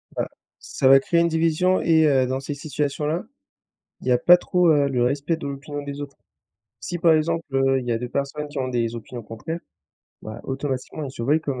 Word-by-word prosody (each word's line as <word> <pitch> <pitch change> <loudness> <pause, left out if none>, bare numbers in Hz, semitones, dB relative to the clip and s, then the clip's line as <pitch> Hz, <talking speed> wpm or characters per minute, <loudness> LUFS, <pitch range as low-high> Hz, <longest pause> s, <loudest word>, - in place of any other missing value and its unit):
Bah, - - -1 0.3
ça 130 - -1
va 135 0 +8
créer 170 +5 +1
une 170 - +3
division 165 +3 +2
et 160 -1 +4
heu, 135 -4 +3
dans 130 +1 -2
ces 140 +2 -5
situations-là, 150 +2 -2 0.8
il - - -8
y - - +3
a 125 - +5
pas 175 +8 +7
trop, 180 -1 +2
heu, 145 -2 +4
le 125 -3 0
respect 140 +6 0
de 140 - -6
l'opinion 140 +1 -6
des 140 0 -6
autres. 140 -1 -8 0.6
Si, 175 +12 -4
par 165 -1 +5
exemple, 165 +1 0
heu, 135 0 +3
il 125 - -8
y 120 - 0
a 115 - 0
2 125 +1 -5
personnes 140 +3 -3
qui 145 -1 -6
ont 130 - -1
des 120 -2 -1
opinions 120 +1 -8
contraires, 140 +11 -6 0.6
bah, 110 +2 -8
automatiquement, 135 +2 -4
ils 135 - -5
se 115 - -7
voient 145 +6 +3
comme 140 -5 -4
140 Hz, 220 wpm, -23 LUFS, 130-160 Hz, 0.8 s, va